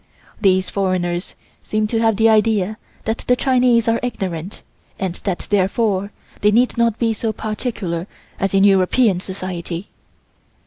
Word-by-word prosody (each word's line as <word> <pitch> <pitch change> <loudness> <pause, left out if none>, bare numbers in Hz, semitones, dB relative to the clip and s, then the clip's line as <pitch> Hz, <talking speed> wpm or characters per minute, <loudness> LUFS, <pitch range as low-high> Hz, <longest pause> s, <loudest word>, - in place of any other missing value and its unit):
These 185 -2 +3
foreigners 185 -2 -1 0.3
seem 215 0 0
to 225 +1 -1
have 225 -2 +3
the 225 +2 +4
idea 215 -2 +2 0.3
that 220 +1 -1
the 250 - +5
Chinese 250 -3 +3
are 230 0 +2
ignorant 190 -7 -4 0.3
and 190 -3 -2
that 185 0 -4
therefore 200 0 +1 0.3
they 210 - +5
need 240 +4 +3
not 235 -2 +2
be 230 -2 +1
so 220 +1 -2
particular 215 -6 -4 0.3
as 195 0 0
in 195 - +5
European 195 +1 +4
Society. 185 -1 -6
205 Hz, 140 wpm, -20 LUFS, 185-225 Hz, 0.3 s, the